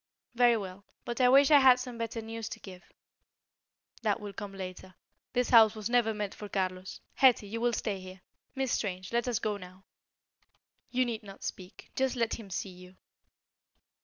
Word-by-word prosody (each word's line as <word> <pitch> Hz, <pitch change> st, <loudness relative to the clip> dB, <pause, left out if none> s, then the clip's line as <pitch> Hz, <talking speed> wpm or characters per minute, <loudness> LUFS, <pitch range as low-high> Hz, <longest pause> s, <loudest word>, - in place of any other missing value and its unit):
"Very 240 Hz, -1 st, +4 dB
well; 195 Hz, -1 st, -7 dB, 0.2 s
but 240 Hz, +2 st, -3 dB
I 250 Hz, -, +6 dB
wish 275 Hz, +3 st, +6 dB
I 290 Hz, -, +9 dB
had 260 Hz, -2 st, +7 dB
some 250 Hz, -2 st, -7 dB
better 230 Hz, 0 st, -4 dB
news 225 Hz, 0 st, -6 dB
to 220 Hz, -, -7 dB
give." 185 Hz, -4 st, -13 dB, 1.1 s
"That 215 Hz, -2 st, +1 dB
will 205 Hz, -2 st, -7 dB
come 205 Hz, 0 st, -7 dB
later. 185 Hz, -1 st, -8 dB, 0.4 s
This 250 Hz, -1 st, 0 dB
house 225 Hz, -2 st, +7 dB
was 215 Hz, +1 st, -4 dB
never 240 Hz, -2 st, +3 dB
meant 210 Hz, -2 st, -4 dB
for 210 Hz, -, -9 dB
Carlos. 185 Hz, -1 st, -3 dB
Hetty, 255 Hz, -5 st, +4 dB
you 230 Hz, +3 st, -5 dB
will 240 Hz, 0 st, +2 dB
stay 210 Hz, -3 st, -2 dB
here. 185 Hz, 0 st, -11 dB, 0.3 s
Miss 265 Hz, -2 st, -1 dB
Strange, 185 Hz, 0 st, -3 dB
let 235 Hz, +1 st, +1 dB
us 240 Hz, -3 st, +1 dB
go 210 Hz, -1 st, -2 dB
now." 185 Hz, 0 st, -13 dB, 1.1 s
"You 255 Hz, 0 st, +1 dB
need 230 Hz, -3 st, -3 dB
not 195 Hz, -2 st, -12 dB
speak; 185 Hz, 0 st, -8 dB
just 265 Hz, 0 st, 0 dB
let 230 Hz, -1 st, -1 dB
him 210 Hz, -3 st, -10 dB
see 190 Hz, +1 st, -4 dB
you." 180 Hz, +1 st, -14 dB
220 Hz, 185 wpm, -30 LUFS, 190-240 Hz, 1.1 s, I